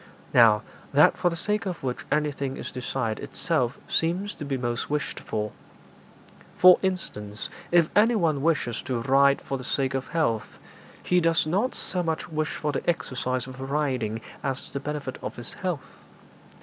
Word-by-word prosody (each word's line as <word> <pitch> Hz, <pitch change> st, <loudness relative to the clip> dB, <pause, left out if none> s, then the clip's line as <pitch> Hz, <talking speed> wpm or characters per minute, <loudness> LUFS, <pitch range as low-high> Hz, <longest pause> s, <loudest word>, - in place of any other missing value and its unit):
Now, 110 Hz, -4 st, +6 dB, 0.3 s
that -, -, +6 dB
for 175 Hz, -, +2 dB
the 170 Hz, -, -4 dB
sake 210 Hz, +4 st, -1 dB
of 180 Hz, -6 st, -4 dB
which 125 Hz, -2 st, -3 dB
anything 140 Hz, -3 st, 0 dB
is -, -, -6 dB
desired 125 Hz, -3 st, -2 dB
itself 140 Hz, -9 st, -1 dB
seems 180 Hz, +5 st, 0 dB
to -, -, -8 dB
be 140 Hz, -2 st, -2 dB
most 120 Hz, -1 st, -2 dB
wished 150 Hz, -1 st, -2 dB
for. 105 Hz, -1 st, -3 dB, 1.1 s
For 180 Hz, 0 st, +8 dB
instance, 105 Hz, -, -3 dB, 0.2 s
if 170 Hz, -2 st, +5 dB
anyone 205 Hz, -, +3 dB
wishes 140 Hz, -7 st, +1 dB
to 125 Hz, -3 st, -2 dB
ride 140 Hz, +2 st, +4 dB
for 135 Hz, -, -3 dB
the -, -, -7 dB
sake 135 Hz, +1 st, 0 dB
of 135 Hz, -1 st, -2 dB
health, 150 Hz, -9 st, -1 dB, 0.5 s
he 180 Hz, -, +3 dB
does 165 Hz, -1 st, +3 dB
not 195 Hz, +11 st, 0 dB
so 180 Hz, -, -1 dB
much 165 Hz, 0 st, -2 dB
wish 155 Hz, -1 st, -2 dB
for 150 Hz, -, -1 dB
the 145 Hz, -, -2 dB
exercise 130 Hz, -6 st, -1 dB
of 130 Hz, 0 st, -9 dB
riding 130 Hz, -6 st, -1 dB, 0.2 s
as 135 Hz, -1 st, -3 dB
the 140 Hz, -, -3 dB
benefit 145 Hz, -2 st, -4 dB
of -, -, -5 dB
his 120 Hz, -, -7 dB
health. 180 Hz, -7 st, -5 dB
140 Hz, 165 wpm, -26 LUFS, 130-165 Hz, 1.1 s, For